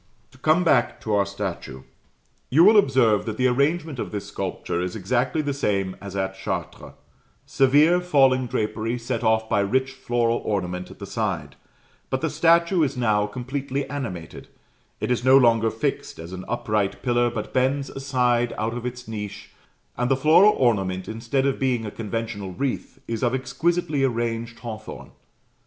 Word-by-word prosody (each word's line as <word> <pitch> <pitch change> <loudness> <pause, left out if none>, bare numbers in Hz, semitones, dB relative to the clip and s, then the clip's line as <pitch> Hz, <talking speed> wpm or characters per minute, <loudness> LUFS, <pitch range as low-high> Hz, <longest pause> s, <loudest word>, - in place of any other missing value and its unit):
To 130 - -20
come 155 +6 +3
back 120 -7 +2
to 110 - -2
our 100 -1 +2
statue. 95 -9 -5 0.7
You 155 +6 +5
will 215 +4 +7
observe 125 - +3
that 110 -1 -3
the 130 - +1
arrangement 140 +3 +1
of - - -4
this 105 -2 -4
sculpture 85 - -4
is 90 0 -3
exactly 125 - 0
the 145 -1 -1
same 100 -8 -1
as 100 -1 -8
at 95 0 -1
Chartres 95 - -5 0.5
severe 150 +6 +4
falling 135 -7 +3
drapery, 115 +1 -2
set 120 0 -3
off 110 0 +2
by 105 - +1
rich 130 +7 +1
floral 120 -3 0
ornament 90 -3 -3
at - - -12
the - - -7
side; - - -3 0.5
but 130 - -1
the 160 - -1
statue 170 +3 +3
is 140 -3 0
now 105 -4 +2
completely 135 +4 -4
animated: 95 - -6 0.5
it - - -2
is 120 -1 0
no 130 +1 +7
longer 115 -3 +4
fixed 110 0 -3
as 85 +2 -9
an 95 0 -7
upright 105 -4 -1
pillar, 120 -1 +2
but 110 -3 -6
bends 135 +2 +1
aside 125 -3 0
out 110 +1 -1
of 120 0 -4
its 125 -1 -7
niche, 105 -2 -7 0.5
and 125 0 +1
the 135 - +3
floral 160 +9 +6
ornament, 95 -7 +1
instead 115 +4 -1
of 135 -1 0
being 125 -4 0
a 105 - -5
conventional 110 -3 -4
wreath, 135 +5 -3
is 115 -1 -3
of 120 0 +1
exquisitely 155 +2 0
arranged 115 -2 -2
hawthorn. 110 -2 -8
120 Hz, 170 wpm, -24 LUFS, 105-135 Hz, 0.7 s, will